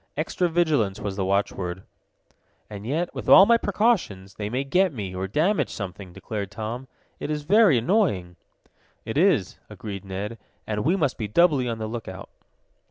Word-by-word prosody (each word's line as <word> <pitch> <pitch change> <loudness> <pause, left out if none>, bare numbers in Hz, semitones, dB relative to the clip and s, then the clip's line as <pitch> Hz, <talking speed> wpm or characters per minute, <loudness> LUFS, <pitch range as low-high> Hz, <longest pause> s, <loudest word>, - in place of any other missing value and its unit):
Extra 170 +3 0
vigilance 150 - +1
was 100 -2 -4
the 95 - -1
watchword. 95 -2 -1 0.9
"And 105 +1 -7
yet, 165 +6 -1
with - - -5
all 190 - +10
my 235 +2 +5
precautions, 195 - 0
they 105 -1 -5
may 130 +4 -1
get 180 +7 +2
me, 100 -8 -6
or 95 +1 -3
damage 165 - +1
something," 95 -2 -7
declared 100 +2 -5
Tom. 115 +5 -6 0.3
"It - - -5
is 150 -1 -2
very 200 - +5
annoying!" 115 - +1 0.7
"It - - -5
is," - - +2
agreed 100 -3 -7
Ned, 100 +4 -5 0.3
"and 105 -1 -2
we 170 +7 +2
must 145 -10 -1
be 110 - -2
doubly 140 - +3
on 115 - -3
the 110 - -4
lookout." 110 -4 -7
115 Hz, 165 wpm, -24 LUFS, 100-165 Hz, 0.9 s, all